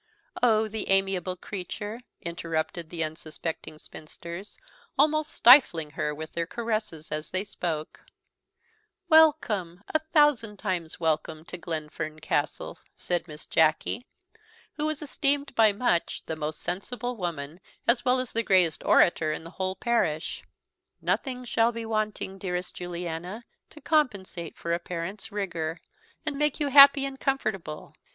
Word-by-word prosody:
"Oh, 220 -2 +4
the 220 +1 -5
amiable 195 -2 +1
creature!" 205 +5 -6 0.2
interrupted 165 -1 -3
the 165 -2 -1
unsuspecting 155 0 -5
spinsters, 170 +5 -9 0.4
almost 310 +1 +3
stifling 205 - +6
her 150 - -2
with 155 +1 -7
their 170 -1 -2
caresses 215 -8 -3
as 155 0 -3
they 185 +1 -1
spoke: 165 -6 -4 1.1
"Welcome, 225 - +4
a 315 - +2
thousand 295 -9 +2
times 180 -6 -3
welcome, 155 -1 -1
to 180 - -7
Glenfern 155 -2 -5
Castle," 155 -2 -2 0.2
said 175 0 -2
Miss 150 -1 -9
Jacky, 160 +9 +2 0.7
who 300 0 -2
was 310 0 -3
esteemed 285 -1 0
by 220 -3 +5
much 200 -5 0
the 160 - -3
most 155 0 -4
sensible 245 +7 -3
woman, 170 -5 -4 0.3
as 235 +1 +4
well 255 0 +3
as 255 -2 -3
the 230 - +2
greatest 185 -7 +3
orator 165 -3 +4
in 155 - -4
the 165 - -10
whole 185 0 -2
parish; 180 -11 0 0.6
"nothing 250 -2 -1
shall 230 0 +2
be 230 -1 -5
wanting, 215 -3 -2
dearest 180 -1 -3
Lady 180 - -6
Juliana, 175 +5 -5 0.2
to 305 - -13
compensate 205 - 0
for 170 - -2
a 170 - +1
parent's 175 +5 -5
rigour, 170 -5 -3 0.5
and 290 -2 -2
make 300 -2 +1
you 290 -2 0
happy 280 0 +9
and 270 -1 -6
comfortable. 215 - -2
190 Hz, 140 wpm, -27 LUFS, 165-240 Hz, 1.1 s, happy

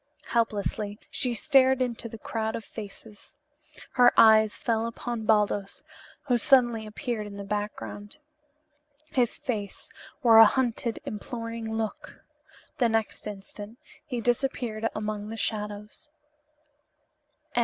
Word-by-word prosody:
Helplessly 210 -2 -1
she 245 -2 +1
stared 265 0 +4
into 240 -2 -2
the 225 - -8
crowd 220 +1 -3
of 225 - -6
faces. 210 0 -11 0.6
Her 245 -1 +6
eyes 220 -1 +6
fell 230 -1 0
upon 230 -1 -5
Baldos, 205 -2 +1 0.4
who 245 -4 +1
suddenly 240 -4 +3
appeared 220 -1 -4
in 200 -1 -9
the 200 - -5
background. 205 +2 -5 0.9
His 245 -3 +1
face 210 -5 -5 0.3
wore 225 -2 +8
a 225 - +11
hunted, 240 -3 0
imploring 230 +1 -5
look. 220 -1 -5 0.5
The 240 -3 +4
next 225 -1 -1
instant 205 +2 -9 0.3
he 245 -4 -4
disappeared 240 -2 -1
among 210 -1 -3
the 225 +1 -6
shadows. 210 +5 -4
225 Hz, 115 wpm, -27 LUFS, 210-240 Hz, 0.9 s, a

